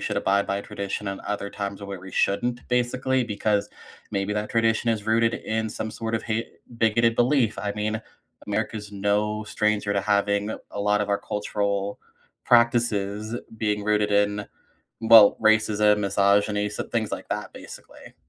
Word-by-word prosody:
should 105 - -3
abide 100 0 +1
by 100 0 -1
tradition 100 0 -5
and 95 - -5
other 100 -1 -4
times 100 0 -5
where 100 -2 -6
we 95 +1 -11
shouldn't 120 +5 0
basically 125 +1 +1
because 105 -1 0 0.4
maybe 100 +1 -1
that 105 0 -3
tradition 115 0 +2
is 110 -1 -2
rooted 115 +1 +2
in 110 0 -2
some, 110 +1 -5
sort 115 +1 -4
of, 110 - -1
ha 115 0 -2 0.3
bigoted 115 +1 +3
belief. 120 -4 +2
I 100 +1 -2
mean, 110 +1 -2 0.5
America's 105 -1 -3
no 105 +2 0
stranger 105 -1 0
to 100 - +1
having 100 +1 +1 0.2
a 100 - -5
lot 105 0 +2
of 105 - -2
our 100 - +1
cultural 100 -1 -2 0.5
practices 115 -3 +2 0.2
being 105 -1 -1
rooted 105 0 +1
in, 105 0 +1 0.5
well, 110 -2 +8
racism, 105 -1 +4
misogyny, 100 +1 +2
so - - -4
things - - -2
like - - -6
that - - -4
basically. - - -12
105 Hz, 160 wpm, -25 LUFS, 100-110 Hz, 0.5 s, well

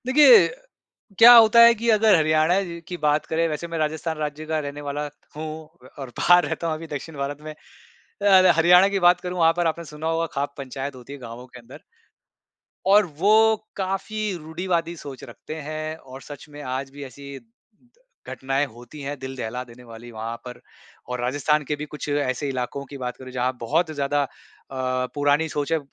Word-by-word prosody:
देखिए, 300 - +7 0.7
क्या 235 +2 +11
होता 230 -1 +7
है 235 0 +8
कि 235 - 0
अगर 215 -1 +5
हरियाणा 155 +2 +2 0.3
की 180 - -5
बात 150 -1 +1
करें, 165 +1 0
वैसे 155 +2 -4
मैं 165 0 -5
राजस्थान 160 +1 -2
राज्य 150 0 -4
का 155 0 -1
रहने 145 0 -6
वाला 145 +1 -4 0.3
हूँ 155 +1 -5 0.5
और 135 -2 -6
बाहर 175 0 +5
रहता 170 - -3
हूँ 160 - -1
अभी 165 +1 -8
दक्षिण 145 +2 -7
भारत 140 +1 -4
में 155 0 -8 0.7
अ, 190 -3 +6
हरियाणा 180 +3 +6
की 200 0 -1
बात 180 0 +3
करूँ, 180 0 -5
वहाँ 165 -1 +5
पर 175 -1 0
आपने 165 +1 -2
सुना 150 0 -8
होगा 165 0 0
खाप 140 0 -3
पंचायत 135 +1 -6
होती 125 +2 -12
है, 140 - -8
गाँवों 120 +1 -9
के 125 -1 -14
अंदर। 115 - -14 1.1
और 205 +2 +6
वो 220 +5 +4 0.2
काफ़ी 200 +2 -3
रूढ़िवादी 170 +1 -3
सोच 140 -4 -10
रखते 140 +4 -9
हैं 155 +1 -5
और 135 -2 -12
सच 145 +1 -11
में 145 0 -10
आज 130 0 -4
भी 145 +1 -9
ऐसी 140 +1 -10 0.9
घटनाएँ 135 +2 -1
होती 120 +5 -13
हैं, 145 +1 -5
दिल 130 0 -7
दहला 125 +1 -4
देने 125 0 -15
वाली 115 0 -12
वहाँ 115 +1 -5
पर 125 0 -9 0.5
और 125 -1 -3
राजस्थान 145 +4 0
के 150 +2 -3
भी 150 +1 -6
कुछ 150 0 -7
ऐसे 145 -1 -1
इलाकों 130 +1 -4
की 140 +1 -10
बात 125 -2 -5
करूँ, 130 -1 -10
जहाँ 125 0 -1
बहुत 160 +8 0
ज़्यादा 145 -1 0
अ, 130 -1 -5
पुरानी 145 +2 +2
सोच 145 +1 -3
है। 160 - +2
150 Hz, 190 wpm, -23 LUFS, 135-165 Hz, 1.1 s, क्या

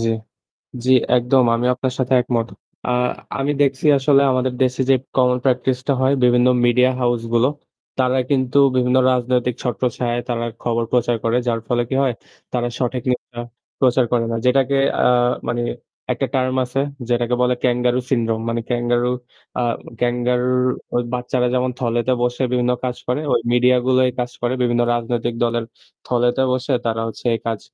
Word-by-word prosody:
জি। 115 - 0 0.8
জি, 130 - +1 0.3
একদম। 125 +2 +3
আমিও 125 +2 +1
আপনার 130 0 -2
সাথে 130 0 -1
একমত। 120 -2 -1 0.4
আ - - -1 0.5
আমি 135 +1 0
দেখসি 140 0 +1
আসলে 140 0 +4
আমাদের 130 0 0
দেশে 130 0 0
যে - - +7 0.2
common 125 -1 +3
practice 130 -1 +1
টা 140 - +4
হয়, 130 +1 +3
বিভিন্ন 125 0 +4 0.2
মিডিয়া 125 +2 +4
হাউসগুলো, 120 0 +1 0.5
তারা 130 0 +2
কিন্তু 130 -1 +1 0.2
বিভিন্ন 125 0 +2
রাজনৈতিক 125 -1 0
ছত্রছায়ায় 125 -1 -1
তারা 115 -1 -1 0.2
খবর 115 -1 0
প্রচার 120 -1 +2
করে। 115 +1 +1
যার 115 -1 0
ফলে 120 0 +1
কী 130 - -3
হয়? 130 -3 +1 0.4
তারা 120 -1 -1
সঠিক 125 -1 -2
নিউজটা 120 -1 -4 0.4
প্রচার 130 -1 +3
করে 120 -1 +2
না। 115 - -1
যেটাকে 135 +1 +3 0.2
অ্যা - - 0 0.5
মানে 120 0 -1 0.5
একটা - - -1
টার্ম 130 0 +1
আছে 125 +2 -2 0.3
যেটাকে 120 0 +1
বলে 125 0 +2
Kangaroo 125 0 +1
Syndrome 115 -3 0
মানে 115 0 -1
ক্যাঙ্গারু 120 0 0 0.5
আ 125 - +1 0.4
ক্যাঙ্গারুর 125 +1 +1 0.3
ওই 120 - +2
বাচ্চারা 125 0 -1
যেমন 125 0 +1
থলেতে 120 +1 0
বসে 125 +1 -1
বিভিন্ন 125 0 +1
কাজ 125 -1 -2
করে, 125 +4 0
ওই - - +3
মিডিয়াগুলো 125 +1 +3
এই 125 - -3
কাজ 120 - -2
করে। 120 +1 0
বিভিন্ন 120 -1 +1
রাজনৈতিক 120 0 -2
দলের 120 0 -1 0.4
থলেতে 125 +1 +1
বসে 130 +2 -1
তারা 115 0 -1
হচ্ছে 115 - -10
এই 115 - -1
কাজ 115 -3 -2
125 Hz, 165 wpm, -20 LUFS, 120-130 Hz, 0.8 s, যে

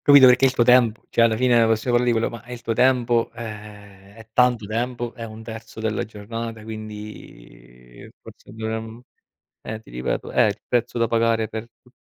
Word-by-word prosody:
capito, 140 -2 +8
perché 130 +1 +6
è - - +5
il 130 - -4
tuo 120 - +3
tempo, 120 -3 +4
cioè, 115 - +4
alla 110 -1 +3
fine, 120 -1 +4
possiamo 110 +2 0
parlare 120 0 +3
di 115 - +1
quello, 110 - 0
ma 115 -2 -9
è 120 - -11
il 120 -1 -8
tuo 115 - -1
tempo, 120 -1 +2
eh, 105 -3 -10
è 110 0 -14
tanto 125 -3 +3
tempo, 120 +2 -3
è 115 - -7
1/3 110 0 -9
della 110 -1 -1
giornata. 115 +1 -7
Quindi, 105 - -11
forse, - - -15
dovremmo 110 +1 -5 0.6
eh, 110 0 -6
ti - - -18
ripeto: 60 +1 -3
è - - +3
il - - -1
prezzo 120 0 -1
da 115 0 +2
pagare 115 -1 +1
per 110 +1 -6 0.2
tu 125 - -23
115 Hz, 195 wpm, -23 LUFS, 110-120 Hz, 0.6 s, capito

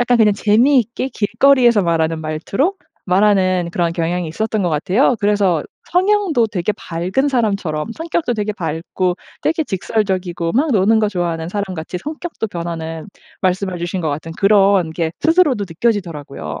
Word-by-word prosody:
약간 245 0 +3
그냥 215 -2 +5
재미있게 240 +4 +2
길거리에서 240 0 +3
말하는 165 -2 0
말투로 165 - -1 0.3
말하는 185 -2 +2
그런 170 -1 0
경향이 170 0 -1
있었던 215 +5 -2
것 175 - +1
같아요. 190 - +2
그래서 200 -6 +2 0.3
성향도 365 - +2
되게 195 +1 -1
밝은 185 +13 -2
사람처럼 200 - -1
성격도 325 -6 -1
되게 210 0 -2
밝고 175 +1 -2 0.3
되게 320 0 0
직설적이고 185 - -2
막 290 +5 +2
노는 220 0 +3
거 215 - +2
좋아하는 170 -4 -2
사람 200 -1 -3
같이 160 +2 -6
성격도 305 - -5
변하는 165 -2 -5 0.3
말씀해 185 -1 -1
주신 175 +2 -3
것 160 - 0
같은 155 +3 -5
그런 195 -4 +4
게 160 0 -2
스스로도 320 - +3
느껴지더라고요. 165 - -3
195 Hz, 370 characters per minute, -18 LUFS, 170-230 Hz, 0.3 s, 그냥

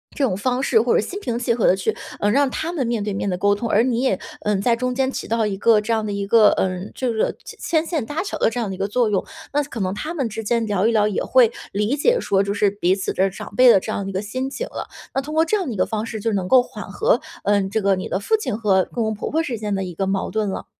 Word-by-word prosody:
这 285 - -1
种 200 -8 0
方 250 +4 0
式 230 -5 +4
或 240 - +1
者 - - +4
心 385 - -5
平 240 - -3
气 240 -1 +1
和 230 -2 +2
地 - - +5
去， 195 +3 -1 0.2
呃， 205 - +2
让 280 +2 +3
他 325 +6 -3
们 285 -8 -1
面 235 -3 -1
对 205 -1 -2
面 195 0 -2
地 180 - -1
沟 205 +2 +3
通， 230 +2 -3
而 220 +3 +4
你 245 -2 0
也， 255 -8 +1 0.2
呃， 210 -1 0
在 230 +4 +2
中 250 +1 -2
间 265 0 +1
起 - - -5
到 225 -1 +1
一 195 -2 -2
个 215 0 +4
这 225 +2 -3
样 220 -1 0
的 205 - -3
一 200 0 -2
个， 215 0 +6
呃， 185 0 -1
就 250 -3 -1
是 220 - 0
牵 320 -1 -1
线 315 -9 -2
搭 295 +7 -3
桥 - - -4
的 - - +3
这 245 - -4
样 220 -4 -2
的 190 - -4
一 - - -12
个 195 +1 -1
作 230 +1 +1
用， 195 -3 0 0.3
那 295 +1 +2
可 270 -5 -7
能 185 0 -1
他 305 +11 -4
们 275 -8 -1
之 220 +1 -5
间 230 +1 0
聊 205 +1 +1
一 - - +3
聊， 210 -2 +3
也 210 - -1
会 250 -3 +4 0.2
理 210 +7 0
解 475 - +3
说 195 -1 +1
就 200 - -2
是 205 0 +2
彼 190 -2 +1
此 195 - -3
的 190 +1 +2
长 190 - -9
辈 255 -1 +7
的 195 - +7
这 215 - -5
样 200 - -2
的 195 - -5
一 - - -6
个 190 - -1
心 255 +6 -3
情 - - -5
了， - - -6 0.3
那 270 - 0
通 305 +3 -7
过 320 - +5
这 425 +6 +1
样 370 - -3
的 240 - -3
一 - - -6
个 - - +2
方 220 0 -3
式 220 -1 -5
就 225 +2 -1
能 185 -2 -1
够 255 +3 +6
缓 - - -9
和， - - +2 0.2
呃， 205 0 +3
这 220 +1 -1
个 195 -1 +3
你 185 - -4
的 190 - -1
父 440 - +1
亲 255 - -3
和 195 -4 +2
公 235 - -1
公 220 0 -1
婆 210 - -4
婆 320 +2 +1
之 250 -7 -3
间 210 -2 -2
的 195 - -2
一 180 -2 -6
个 190 +3 -2
矛 195 0 -1
盾 215 -2 0
了。 - - -5
220 Hz, 345 characters per minute, -21 LUFS, 200-255 Hz, 0.3 s, 辈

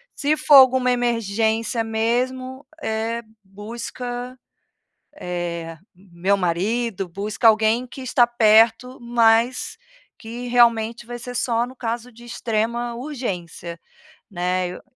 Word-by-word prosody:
se 300 +2 0
for 300 -1 +5
alguma 260 -1 +7
emergência 230 -1 0
mesmo, 255 +4 -2 0.2
eh, 225 +1 -2 0.2
busca, 240 +5 -7 0.9
eh, 170 -2 -5 0.2
meu 185 +1 -1
marido, 195 +3 -1
busca 210 +6 -2
alguém 220 +3 +3
que 255 - -11
está 250 -1 +3
perto, 230 +2 +3
mas 235 +1 +2 0.4
que 240 +2 -7
realmente 235 -1 +2
vai 240 - -6
ser 245 +1 -8
só 235 -1 0
no 255 +1 -12
caso 240 0 -4
de 235 +2 -15
extrema 235 +1 -2
urgência, 190 - -6 0.5
né, 180 -1 -1
eu 180 - -9
230 Hz, 110 wpm, -22 LUFS, 210-245 Hz, 0.9 s, alguma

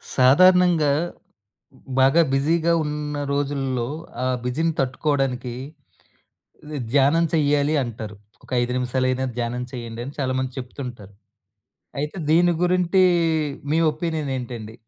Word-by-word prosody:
సాధారణంగా 170 +3 +5 1.1
బాగా 135 +5 +5
బిజీగా 160 +5 +2
ఉన్న 150 -1 -3
రోజుల్లో, 135 -4 -1 0.4
ఆ - - 0 0.2
బిజీని 160 +7 0
తట్టుకోవడానికి 130 -2 -1 1.2
ద 150 - -4
ధ్యానం 145 +4 +4
చెయ్యాలి 145 0 +2
అంటారు. 110 -3 -7 0.3
ఒక - - -18
5 120 0 -2
నిమిషాలైనా 130 +1 0
ధ్యానం 120 +1 -2
చేయండి 115 -2 -6
అని 135 - -7
చాలామంది 130 -1 -1
చెప్తుంటారు. 125 -5 -8 0.9
అయితే 150 +5 -4
దీని 175 +2 +4
గురించి 180 +1 +2 0.7
మీ 160 - +3
ఒపీనియనేంటండి? 135 -9 -4
135 Hz, 100 wpm, -23 LUFS, 125-155 Hz, 1.2 s, సాధారణంగా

